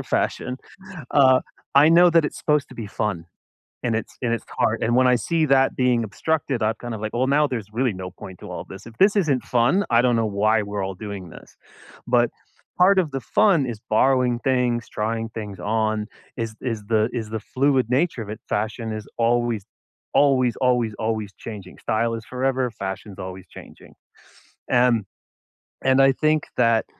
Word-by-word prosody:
for - - -4
fashion, 125 0 -1 0.6
uh, 130 -2 +5 0.3
I 145 +3 +7
know 175 +2 +7
that 165 -2 +4
it's - - -5
supposed 150 -2 0
to 130 - -12
be 115 -4 -6
fun, 100 -5 -3 0.6
and 120 -2 0
it's 115 - -4
and 120 -2 0
it's 115 - -4
hard, - - 0
and 120 +1 +1
when 130 0 +4
I 125 - +5
see 160 +6 0
that 135 -1 +3
being 125 -3 +2
obstructed, 135 +1 -2
I'm 110 +1 +1
kind 120 +1 -7
of 105 - -8
like, 110 0 -3
"Well, 125 +2 +1
now 145 +2 +3
there's 120 -8 -4
really 125 +1 +1
no 95 -1 -6
point 90 0 -11
to - - -10
all - - -5
this. 95 - -11
If 115 - -12
this 205 +2 +5
isn't 145 -9 +1
fun, 125 +12 +2
I 115 0 +4
don't 125 -1 +2
know 115 -1 +1
why 110 +1 +2
we're 100 -1 -4
all 95 0 -4
doing 100 -3 -7
this." - - -15 0.5
But 120 -1 +3 0.5
part 190 +2 +5
of 160 -6 0
the 135 - -3
fun 170 - +3
is 115 -4 -6
borrowing 125 +1 +3
things, 125 -2 0
trying 115 +1 -2
things 105 -4 -7
on, 110 +2 -1 0.3
is 115 -2 -4
is 115 -4 -3
the 110 0 +2
is 110 -3 -4
the 110 - -3
fluid 130 +1 +1
nature 135 0 +1
of 105 - -7
it, 110 - -6
fashion 110 +1 -2
is 110 -1 -6
always, 120 -3 +1 0.5
always, 130 -4 +3
always, 120 -4 +2
always 110 -2 -2
changing. 100 -5 -9
Style 115 +1 0
is 115 -1 -5
forever, 130 -1 -1
fashion's 95 -1 -6
always 95 0 -7
changing. - - -14 0.8
And 120 -4 +3 0.8
and 130 0 +3
I 135 - +6
think 155 +2 +1
that 115 -2 +3
120 Hz, 190 wpm, -23 LUFS, 110-130 Hz, 0.8 s, I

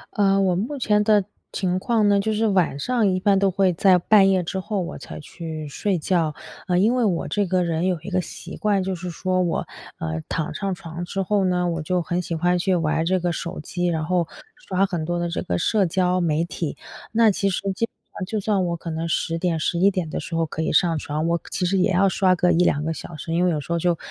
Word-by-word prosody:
呃， 195 -2 +3
我 185 -2 +2
目 230 +11 -2
前 210 -5 +2
的 210 -2 +3 0.3
情 185 -1 -1
况 220 -1 +2
呢， 200 0 +4
就 220 +2 0
是 220 +1 +1
晚 185 -8 +2
上 230 - +1
一 185 -1 +1
般 195 +1 +3
都 195 - +3
会 190 -1 +2
在 185 +1 +5
半 195 +2 +5
夜 185 -2 +2
之 190 +3 -3
后 205 +1 -2
我 170 - -5
才 - - -9
去 155 0 -7
睡 190 +6 -1
觉。 165 -1 0 0.3
呃， 180 - +2
因 215 +6 +4
为 250 -2 +1
我 180 -6 0
这 205 -2 0
个 180 0 +1
人 170 +1 0
有 180 -3 0
一 195 - -7
个 185 0 +2
习 - - -9
惯， 205 -3 +1
就 190 0 -2
是 180 0 -5
说 185 +2 -1
我， 175 -2 -1 0.3
呃， 80 0 -3
躺 160 -2 -2
上 195 -2 -2
床 170 0 -7
之 195 +2 -3
后 200 +1 +1
呢， 180 -1 +1
我 165 -1 -2
就 180 +4 0
很 175 +1 -1
喜 170 -1 -4
欢 175 +2 +2
去 185 +1 +1
玩 160 -1 +1
这 185 +2 +1
个 175 0 0
手 170 +1 -5
机， 175 +4 -2
然 160 -2 -1
后 175 -1 +1 0.4
刷 195 +1 +2
很 175 -5 -3
多 175 +2 -2
的 175 - -1
这 - - -2
个 85 - -1
社 200 - +2
交 180 +1 +1
媒 165 0 +1
体。 165 -3 -4 0.3
那 225 -1 +5
其 200 +1 0
实 185 - -2
基 230 +4 -1
本 - - -54 0.2
上 185 - -2
就 215 - -2
算 200 -2 +1
我 170 0 -2
可 165 0 -6
能 165 +1 -3
10 165 +1 -1
点、 170 -2 0
11 175 +5 +2
点 185 -4 -2
的 - - -2
时 165 - -5
候 165 0 +1
可 155 - -5
以 160 - 0
上 165 +1 +3
床， 150 +2 -3
我 170 0 0
其 180 - -1
实 195 +2 +1
也 185 - +3
要 190 +2 +4
刷 185 0 +3
个 180 0 +2
1-2 165 -4 +2
个 160 +1 -1
小 165 +1 -8
时， 160 +2 -5
因 175 +2 +2
为 - - +3
有 155 - -1
时 145 - -8
候 170 - +1
就 175 -1 +1
180 Hz, 270 characters per minute, -23 LUFS, 165-195 Hz, 0.4 s, 在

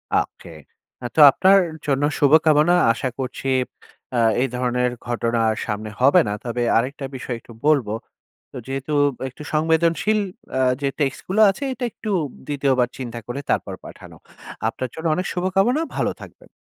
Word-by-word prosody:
ওকে। - - -2 0.5
আ - - -5
তো - - +1
আপনার 195 +7 +5 0.3
জন্য 140 0 +1 0.2
শুভকামনা। 155 +2 +5 0.2
আশা 115 - -3
করছি 130 +1 -4 0.7
আ - - +1 0.2
এই 135 - +2
ধরনের 125 0 0 0.2
ঘটনা 120 -1 -1 0.3
সামনে 110 0 -4
হবে 140 +7 +6
না। 105 - -1
তবে 120 0 -3 0.2
আরেকটা 135 +4 -2
বিষয় 125 -1 -4
একটু 115 - -15
বলব। 145 -7 +3 0.7
তো - - -11
যেহেতু 135 +2 -4 0.4
একটু 130 +3 -12
সংবেদনশীল 165 +6 +2 0.3
অ্যা 130 - +1 0.2
যে 140 - +2
টেক্সট 140 -1 0
গুলো 195 +4 +1
আছে 195 - -8
এটা 255 - -5
একটু 215 - -6 0.4
দ্বিতীয়বার 135 -4 +1
চিন্তা 120 -3 -6
করে 120 +3 -4
তারপর - - -1
পাঠানো। - - -12 0.5
আপনার 130 - -4
জন্য 160 +1 -5
অনেক 180 +3 -2
শুভকামনা। 195 - +1 0.2
ভালো - - +1
থাকবেন। - - -14
140 Hz, 150 wpm, -22 LUFS, 125-165 Hz, 0.7 s, হবে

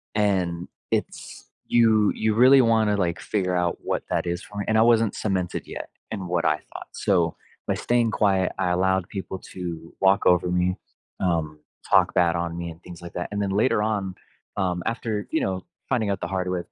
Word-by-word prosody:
and 90 -5 0 0.2
it's, - - -4 0.2
you, 110 -3 +4
you 110 -1 0
really 130 +3 +7
want 115 -2 +3
to 105 - +2
like 85 -3 -1
figure 90 -3 -1
out 90 -1 0
what - - -2
that - - 0
is 85 0 -2
for 105 0 -8
me 100 - -2
and 110 0 +2
I 110 - +6
wasn't 115 -2 +3
cemented 95 -4 -2
yet - - -7 0.2
in 95 -4 -4
what 85 -1 0
I 75 - +3
thought. - - -8
So, - - +1 0.3
by - - +2
staying 120 -2 +1
quiet, 95 -4 +2
I 90 - +1
allowed 95 +1 +1
people 95 -1 -5
to 85 -3 -6
walk 95 0 +4
over 90 0 +3
me, 90 +1 +1 0.4
um, 80 -4 -1 0.3
talk - - +4
bad 85 -2 +3
on 85 -1 -2
me 85 0 -4
and 80 +1 -11
things 90 -2 -11
like 85 0 -9
that 90 - -4
and 105 - -2
then 100 - 0
later 105 +2 +2
on, 100 -4 -1 0.4
um, 90 -2 -1
after, 110 -3 -2
you - - +1
know, 95 -1 -2 0.2
finding 115 -6 +1
out 100 - -3
the - - -2
hard 95 -1 -2
way 90 - 0
of - - -10
95 Hz, 210 wpm, -24 LUFS, 90-105 Hz, 0.4 s, really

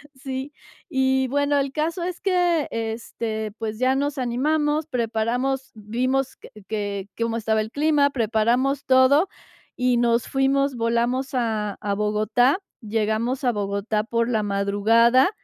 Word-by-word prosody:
Sí. 265 +2 -6 0.4
Y, 265 0 +2
bueno, 285 +2 +1
el 275 -1 -1
caso 325 +5 -2
es 355 0 -4
que, 355 -5 +2
este, 225 -1 -4
pues 220 -1 -4
ya 255 +1 +2
nos 285 +1 -1
animamos, 295 +5 0
preparamos 245 +2 -1
vimos 255 +5 -1
que - - -14 0.2
que 205 -2 -3
cómo 230 0 -1
estaba 220 -1 +1
el 215 +1 -6
clima, 290 0 +3
preparamos 245 +3 +1
todo 265 +7 +5 0.5
y 250 -1 +2
nos 235 -1 +2
fuimos. 270 0 +1
Volamos 235 +3 0
a 220 -4 -1
a 205 -2 -2
Bogotá. 215 - +2 0.2
Llegamos 220 +4 -1
a 250 - +3
Bogotá 205 0 -1
por 230 +1 -1
la 220 -3 +1
madrugada 210 - +3
245 Hz, 135 wpm, -23 LUFS, 220-270 Hz, 0.5 s, todo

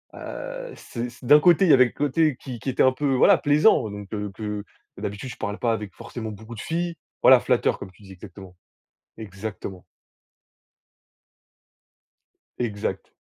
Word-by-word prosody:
heu, - - -7
c 120 0 -6
c 125 - -16
d'un 150 +4 +8
côté, 175 +3 +5
il 160 - +5
y - - +9
avait 130 -1 +7
le - - -4
côté 145 -1 +1
qui 125 -4 -7
qui 135 - -4
était 130 - 0
un 130 0 +4
peu, 140 0 0
voilà, 130 - +6
plaisant 145 - +3
donc 100 -1 -8
que 105 -1 -4
que, 105 0 -5 0.3
d'habitude, 105 +6 -5
je - - -8
parle 100 +1 -4
pas 115 -2 +1
avec, 105 -4 -5
forcément, 110 -3 -7
beaucoup 110 +3 -10
de 105 - -7
filles 170 +1 -2 0.3
voilà, - - +8
flatteur, - - +1
comme 95 - -9
tu 95 - -23
dis, 95 - -13
exactement. 95 -1 -12 0.6
Exactement. 100 -2 -7 2.7
Exact. 110 -4 -3
115 Hz, 170 wpm, -24 LUFS, 105-145 Hz, 2.7 s, y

